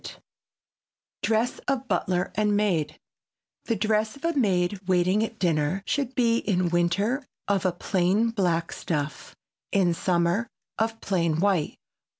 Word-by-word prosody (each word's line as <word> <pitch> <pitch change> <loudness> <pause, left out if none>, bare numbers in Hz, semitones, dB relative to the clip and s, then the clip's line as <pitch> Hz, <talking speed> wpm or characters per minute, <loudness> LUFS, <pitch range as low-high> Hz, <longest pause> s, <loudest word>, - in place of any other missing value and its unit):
[Sidenote: - - -10 1.0
DRESS 225 +2 +1
OF 270 -2 -1
BUTLER 180 -2 0
AND 210 -1 +2
MAID] 170 -8 0 0.7
The 230 - 0
dress 215 +1 0
of 280 +4 -8
a 335 - +1
maid 190 -6 +1
waiting 185 +3 +3
at 225 0 -5
dinner 170 0 0
should 275 -3 -1
be 235 -2 +3
in 180 -3 0
winter 200 +10 +1 0.2
of 195 -2 +1
a - - +2
plain 190 +5 +1
black 175 -6 0
stuff, 150 -2 -4 0.4
in 185 -4 +3
summer 175 +5 +1 0.3
of 225 0 0
plain 170 -5 0
white. 190 -5 +1
195 Hz, 140 wpm, -26 LUFS, 175-225 Hz, 1.0 s, waiting